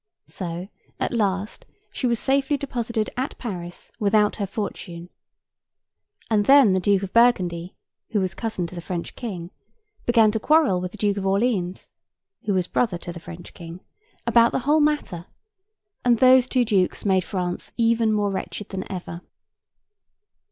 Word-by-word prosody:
So, 175 0 -6 0.3
at - - -1
last 205 -2 -1 0.3
she 255 - -2
was 235 -1 +1
safely 275 +3 +1
deposited 235 -5 -3
at 260 +3 -3
Paris 175 -7 -6
without 210 0 +2
her 200 -3 -2
fortune, 180 -4 -6 1.2
and 210 -2 +1
then 275 -8 +7
the 190 - +2
Duke 200 +1 +2
of 190 - -6
Burgundy 185 -7 +2 0.3
(who 215 - 0
was 185 -1 -1
cousin 220 -6 -3
to 170 - -8
the 175 - -6
French 170 0 -5
King) 185 -7 -6 0.6
began 225 -3 +5
to 220 - -1
quarrel 295 - +3
with 180 0 -4
the 215 - -11
Duke 205 -1 0
of 195 - -3
Orleans 195 -3 0 0.5
(who 205 - +1
was 185 -1 +1
brother 210 -1 0
to 175 0 -7
the 170 - -8
French 170 +1 -11
King) 170 0 -9 0.5
about 235 0 +5
the 260 - -2
whole 300 +2 +4
matter; 295 - 0 0.8
and 240 -1 +4
those 255 +1 +6
two 255 -2 +2
dukes 195 -4 +1
made 190 -2 +3
France 180 -2 -4
even 230 -1 +3
more 205 -1 +1
wretched 195 +1 -5
than 190 -1 -6
ever. 175 -2 -6
205 Hz, 160 wpm, -23 LUFS, 180-235 Hz, 1.2 s, then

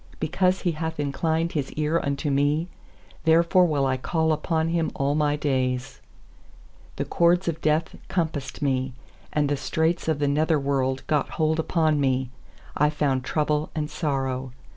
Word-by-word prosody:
2Because 185 0 +1
He 175 - +2
hath 160 0 -4
inclined 160 +3 0
His 145 -4 -2
eai 155 +2 0
unto 140 +1 -1
me, 145 +4 +1 0.6
Therefore 170 +3 +5
will 145 -4 +1
I 130 -1 +1
call 160 +4 +1
upon 160 +1 0
Him 165 -1 0
all 140 +1 +1
my 145 -1 +2
days. 130 -2 -1 1.0
3The - - -2
cords 175 +2 +3
of 165 -1 -2
death 155 +1 +1
compassed 150 -7 -2
me, 130 -2 0 0.4
And 150 -1 +1
the 145 - +1
straits 160 +4 0
of 160 -2 +1
the 145 0 0
nether 155 +2 +2
worlc 135 -1 -1
got 150 -2 0
hold 160 0 +1
upon 160 -2 +1
me; 130 -2 0 0.4
I 150 +1 +3
found 140 -4 0
trouble 150 +1 0
and 150 -1 -2
sorrow. 135 -5 -2
150 Hz, 160 wpm, -25 LUFS, 140-160 Hz, 1.0 s, Therefore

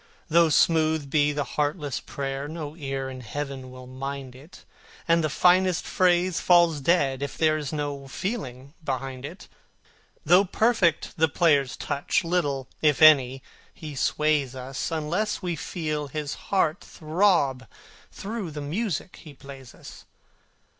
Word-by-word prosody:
Though 165 0 +5
smooth 155 -2 +2
be 150 0 +3
the 145 0 -1
heartless 145 +1 -2
prayer, 135 0 -5
no 155 -1 -6
ear 135 -4 -4
in 130 -1 -8
Heaven 135 +1 -6
will 130 0 -11
mind 135 0 -6
it, 145 +7 -15 0.4
And 165 0 +3
the 155 - 0
finest 180 +3 +3
phrase 180 -1 +2
falls 170 -4 +4
dead 135 -4 +2
if 140 - -5
there 155 -1 +3
is 150 -3 -4
no 145 -2 -4
feeling 135 - -5
behind 135 -1 -4
it. 175 +8 -10 0.8
Though 180 +3 +6
perfect 200 -4 +1
the 160 0 +4
player's 145 -4 +2
touch, 145 +4 -1
little, 145 -6 -1
if 150 -3 +3
any, 135 -4 +6 0.3
he 155 -2 -8
sways 145 -1 0
us, 130 +1 -4
Unless 170 +7 -2
we 175 -2 -2
feel 155 -2 -4
his 145 +1 -4 0.2
heart 180 -3 +1
throb 155 -6 +1 0.4
through 205 -3 -5
the 150 -1 -7
music 180 +5 -3
he 150 -4 -13
plays 135 -2 -12
us. - - -13
150 Hz, 140 wpm, -25 LUFS, 135-170 Hz, 0.8 s, Though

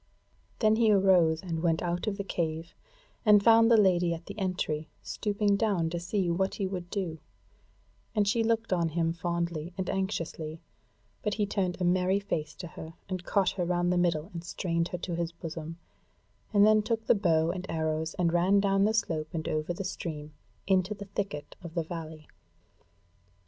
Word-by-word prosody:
Then 215 -1 +3
he 225 -2 +4
arose 185 -5 +4
and 165 -3 -3
went 165 -2 +1
out 175 +3 -2
of 200 -2 -1
the 200 - -2
cave, 165 -3 -3 0.5
and 210 -3 +6
found 230 0 +6
the 230 - +6
Lady 175 -4 +3
at 165 +1 -11
the 200 +1 -8
entry 160 -5 -2
stooping 205 -1 0
down 190 -7 +1
to 175 - -2
see 180 +2 -1
what 185 +3 0
he 200 - -2
would 180 -2 -4
do; 175 -6 -3 1.0
and 205 -2 +2
she 225 +3 +2
looked 225 -2 +1
on 170 -2 +1
him 165 +1 0
fondly 170 -1 -3
and 190 -2 -2
anxiously; 165 -5 -3 0.6
but 210 -2 -1
he 210 - +1
turned 190 -3 -1
a - - -1
merry 185 +2 +2
face 155 -7 -3
to 180 - -7
her, 160 +1 -9
and 185 -1 -4
caught 195 -3 +2
her 185 - -2
round 175 0 +1
the - - +1
middle 170 0 0
and 170 -1 -6
strained 170 -1 -1
her 180 - -4
to 175 0 -4
his 170 0 -2
bosom, 165 -1 -7 0.7
and 205 -1 +6
then 215 0 +5
took 225 +1 -2
the - - +5
bow 165 -6 +2
and 185 +1 -6
arrows 160 0 -1
and 170 -3 +1
ran 185 +4 +4
down 195 0 +3
the 220 +1 +2
slope 155 -7 -1
and 160 - -3
over 155 +2 -1
the 175 +3 -4
stream, 155 -5 -5 0.3
into 190 +2 +2
the 200 0 -8
thicket 195 -7 -5
of 170 -1 -9
the 170 - +1
valley. 160 -2 -7
175 Hz, 190 wpm, -29 LUFS, 165-200 Hz, 1.0 s, and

